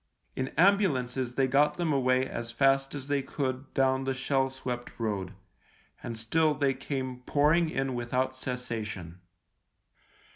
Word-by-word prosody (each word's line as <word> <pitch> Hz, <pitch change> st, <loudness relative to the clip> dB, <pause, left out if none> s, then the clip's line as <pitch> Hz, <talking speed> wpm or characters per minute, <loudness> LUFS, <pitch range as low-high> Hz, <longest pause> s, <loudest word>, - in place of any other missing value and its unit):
In 130 Hz, -, -1 dB
ambulances 135 Hz, -10 st, +2 dB
they 135 Hz, -, +3 dB
got 145 Hz, +3 st, +3 dB
them 165 Hz, -2 st, 0 dB
away 130 Hz, -1 st, +2 dB
as 115 Hz, -2 st, -5 dB
fast 135 Hz, +3 st, +2 dB
as 135 Hz, -1 st, -6 dB
they 145 Hz, -1 st, +1 dB
could 135 Hz, -, -14 dB
52 -, -, -17 dB
THE 135 Hz, -3 st, +2 dB
LIEUTENANT 130 Hz, +2 st, -12 dB
down 130 Hz, 0 st, +2 dB
the 135 Hz, -, 0 dB
shell 135 Hz, 0 st, +1 dB
swept 125 Hz, -2 st, -6 dB
road 100 Hz, -4 st, -2 dB, 0.3 s
— -, -, -32 dB
and 115 Hz, -1 st, -5 dB
still 150 Hz, +7 st, +2 dB
they 140 Hz, -2 st, +2 dB
came 130 Hz, -2 st, -4 dB
pouring 155 Hz, +3 st, +3 dB
in 135 Hz, -3 st, -1 dB
without 125 Hz, +2 st, -1 dB
cessation. 110 Hz, -9 st, -5 dB
130 Hz, 160 wpm, -29 LUFS, 125-140 Hz, 0.3 s, they